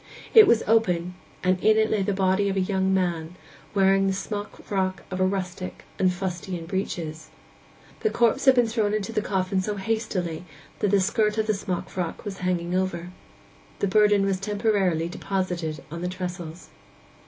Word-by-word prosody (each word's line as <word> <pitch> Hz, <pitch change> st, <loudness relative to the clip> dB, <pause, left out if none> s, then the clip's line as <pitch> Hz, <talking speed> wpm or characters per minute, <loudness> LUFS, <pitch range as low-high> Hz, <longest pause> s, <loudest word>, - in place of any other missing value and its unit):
It 440 Hz, -3 st, +9 dB
was 230 Hz, -, +4 dB
open, 180 Hz, -6 st, +2 dB, 0.3 s
and 185 Hz, 0 st, +1 dB
in 215 Hz, 0 st, +5 dB
it 220 Hz, 0 st, +2 dB
lay 215 Hz, -, +2 dB
the 195 Hz, -, 0 dB
body 190 Hz, +1 st, +2 dB
of 195 Hz, -, -1 dB
a -, -, +3 dB
young 190 Hz, 0 st, +1 dB
man, 175 Hz, -3 st, -1 dB, 0.4 s
wearing 195 Hz, 0 st, +4 dB
the 195 Hz, -, +1 dB
smockfrock 195 Hz, -1 st, -3 dB
of 185 Hz, -, -3 dB
a 185 Hz, -, +3 dB
rustic, 185 Hz, -1 st, -4 dB, 0.2 s
and 185 Hz, -1 st, +4 dB
fustian 180 Hz, -1 st, -4 dB
breeches. 165 Hz, -3 st, -4 dB, 0.7 s
The 440 Hz, -, +1 dB
corpse 240 Hz, -, +2 dB
had 265 Hz, -1 st, +7 dB
been 245 Hz, -1 st, +4 dB
thrown 220 Hz, -2 st, 0 dB
into 215 Hz, +1 st, -2 dB
the 215 Hz, -, +1 dB
coffin 190 Hz, -2 st, 0 dB
so 210 Hz, +2 st, -2 dB
hastily 190 Hz, -5 st, -2 dB, 0.4 s
that 205 Hz, -, +1 dB
the 200 Hz, 0 st, +4 dB
skirt 210 Hz, +2 st, +1 dB
of 220 Hz, -, +1 dB
the 215 Hz, -, +1 dB
smockfrock 185 Hz, -2 st, -4 dB
was 195 Hz, -2 st, -5 dB
hanging 180 Hz, -1 st, -1 dB
over. 180 Hz, -2 st, -1 dB, 0.7 s
The 200 Hz, -, 0 dB
burden 205 Hz, 0 st, +4 dB
was 195 Hz, -1 st, 0 dB
temporarily 200 Hz, -5 st, +1 dB
deposited 180 Hz, -4 st, -3 dB
on 170 Hz, +1 st, -5 dB
the 180 Hz, -, -2 dB
trestles. 180 Hz, -2 st, -6 dB
190 Hz, 170 wpm, -25 LUFS, 180-210 Hz, 0.7 s, It